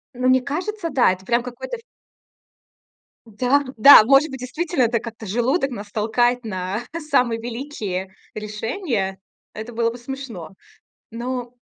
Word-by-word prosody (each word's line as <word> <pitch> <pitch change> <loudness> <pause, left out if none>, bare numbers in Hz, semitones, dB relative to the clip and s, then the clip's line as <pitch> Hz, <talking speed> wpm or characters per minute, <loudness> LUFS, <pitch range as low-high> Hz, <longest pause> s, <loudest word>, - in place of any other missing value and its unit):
Но 250 +1 0
мне 260 0 +5
кажется, 345 +6 -3
да, 250 -8 +4
это 190 +1 -6
прям 235 +2 +2
какой-то 255 - -6
в 460 - -17 1.4
Да-да, 255 +2 +6
может 275 +5 +4
быть, 265 -2 -7
действительно 300 +2 -1
это 230 0 +1
как-то 230 -1 -9
желудок 255 - 0
нас 205 -3 -7
толкает 240 +3 +1
на 190 +1 -3 0.3
самые 240 -5 +2
великие 225 -7 -5 0.2
решения, 215 - -3 0.4
это 220 +3 -7
было 230 0 0
бы 240 - -9
смешно, 240 - -7 0.6
но 245 +1 -4
240 Hz, 135 wpm, -22 LUFS, 220-270 Hz, 1.4 s, Да-да